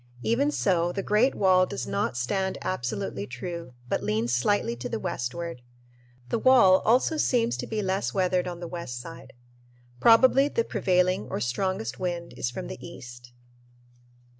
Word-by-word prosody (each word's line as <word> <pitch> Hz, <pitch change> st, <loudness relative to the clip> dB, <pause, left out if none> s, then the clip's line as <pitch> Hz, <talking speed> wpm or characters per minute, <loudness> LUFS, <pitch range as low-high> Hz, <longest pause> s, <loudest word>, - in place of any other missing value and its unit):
Even 265 Hz, +6 st, +2 dB
so, 175 Hz, -, +1 dB
the 195 Hz, +2 st, -3 dB
great 220 Hz, +6 st, +2 dB
wall 185 Hz, -2 st, +4 dB
does 125 Hz, -, -4 dB
not 120 Hz, -, -2 dB
stand 190 Hz, +10 st, -1 dB
absolutely 120 Hz, -, -3 dB
true, 165 Hz, +2 st, -7 dB
but -, -, -1 dB
leans 110 Hz, +3 st, -1 dB
slightly 120 Hz, -, +1 dB
to 120 Hz, -, -5 dB
the -, -, -3 dB
westward. 130 Hz, +5 st, -4 dB, 0.7 s
The -, -, 0 dB
wall 230 Hz, -8 st, +6 dB
also 255 Hz, +7 st, +2 dB
seems 240 Hz, -5 st, +1 dB
to -, -, -5 dB
be 215 Hz, -2 st, -2 dB
less 190 Hz, +1 st, -1 dB
weathered 185 Hz, -2 st, +1 dB
on 175 Hz, -1 st, -6 dB
the 175 Hz, -, -5 dB
west 170 Hz, -9 st, -6 dB
side. 165 Hz, +7 st, -10 dB, 0.7 s
Probably 260 Hz, -, +6 dB
the 230 Hz, -5 st, 0 dB
prevailing 185 Hz, -3 st, +1 dB
or -, -, -3 dB
strongest 125 Hz, -, -2 dB
wind 175 Hz, -2 st, -3 dB
is 120 Hz, -, -2 dB
from 125 Hz, -, -6 dB
the 125 Hz, -, -8 dB
east. 120 Hz, 0 st, -11 dB
180 Hz, 160 wpm, -26 LUFS, 125-205 Hz, 0.7 s, wall